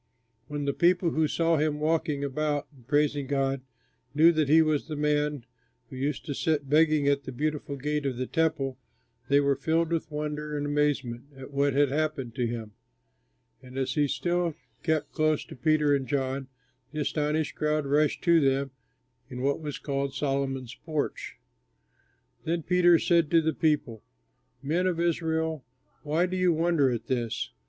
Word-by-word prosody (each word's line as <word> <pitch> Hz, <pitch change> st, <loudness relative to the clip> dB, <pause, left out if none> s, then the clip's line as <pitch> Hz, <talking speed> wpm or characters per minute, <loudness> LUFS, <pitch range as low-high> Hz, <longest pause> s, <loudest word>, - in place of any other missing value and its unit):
When 145 Hz, -1 st, -4 dB
the 140 Hz, -, 0 dB
people 175 Hz, +1 st, +3 dB
who 160 Hz, 0 st, +2 dB
saw 165 Hz, +2 st, +1 dB
him 150 Hz, 0 st, 0 dB
walking 155 Hz, -2 st, 0 dB
about 145 Hz, +1 st, -1 dB
and 125 Hz, -4 st, -20 dB
praising 145 Hz, -1 st, +1 dB
God 135 Hz, -1 st, 0 dB, 0.5 s
knew 160 Hz, +3 st, +7 dB
that 155 Hz, -4 st, 0 dB
he 160 Hz, +2 st, +7 dB
was 155 Hz, -2 st, 0 dB
the 155 Hz, -, -4 dB
man 150 Hz, -3 st, 0 dB, 0.5 s
who -, -, -8 dB
used 140 Hz, +2 st, -2 dB
to 145 Hz, -, -3 dB
sit 145 Hz, 0 st, 0 dB
begging 155 Hz, 0 st, +3 dB
at 140 Hz, 0 st, +1 dB
the -, -, -5 dB
Beautiful 150 Hz, +2 st, -3 dB
Gate 150 Hz, +1 st, -2 dB
of 130 Hz, -3 st, -3 dB
the 130 Hz, -, -2 dB
Temple, 155 Hz, -5 st, -1 dB, 0.5 s
they 140 Hz, +1 st, +5 dB
were 140 Hz, -1 st, +2 dB
filled 165 Hz, +4 st, 0 dB
with 165 Hz, -2 st, -1 dB
wonder 150 Hz, 0 st, -4 dB
and 145 Hz, -, -2 dB
amazement 145 Hz, -5 st, 0 dB
at 135 Hz, +1 st, -10 dB
what 140 Hz, 0 st, +1 dB
had 145 Hz, 0 st, +3 dB
happened 145 Hz, -4 st, -2 dB
to 125 Hz, -2 st, -1 dB
him; 115 Hz, -2 st, -5 dB, 0.9 s
and 130 Hz, 0 st, -11 dB
as 130 Hz, -1 st, -1 dB
he 145 Hz, -2 st, +2 dB
still 170 Hz, +4 st, -1 dB, 0.3 s
kept 160 Hz, -1 st, 0 dB
close 155 Hz, -1 st, +1 dB
to -, -, -11 dB
Peter 150 Hz, +2 st, +2 dB
and 135 Hz, -2 st, 0 dB
John, 135 Hz, -1 st, -2 dB, 0.4 s
the 155 Hz, -, -3 dB
astonished 150 Hz, +1 st, -1 dB
crowd 150 Hz, -1 st, 0 dB
rushed 145 Hz, +2 st, +1 dB
to 170 Hz, -1 st, +5 dB
them 135 Hz, -1 st, +1 dB, 0.6 s
in 125 Hz, 0 st, -6 dB
what 140 Hz, +3 st, 0 dB
was 150 Hz, -2 st, -4 dB
called 140 Hz, -1 st, -3 dB
Solomon's 135 Hz, -3 st, -2 dB
Porch. 155 Hz, -2 st, -3 dB, 1.1 s
Then 165 Hz, 0 st, -1 dB
Peter 175 Hz, 0 st, +5 dB
said 170 Hz, -2 st, +2 dB
to 165 Hz, -, +5 dB
the 160 Hz, 0 st, 0 dB
people: 145 Hz, -8 st, 0 dB, 0.6 s
"Men 170 Hz, +6 st, +1 dB
of 175 Hz, -2 st, -1 dB
Israel, 160 Hz, -3 st, 0 dB, 0.4 s
why 155 Hz, +4 st, +1 dB
do 185 Hz, 0 st, -3 dB
you 185 Hz, -1 st, +3 dB
wonder 165 Hz, -4 st, +2 dB
at 120 Hz, -2 st, -3 dB
this? 120 Hz, -3 st, -2 dB
150 Hz, 170 wpm, -27 LUFS, 135-160 Hz, 1.1 s, knew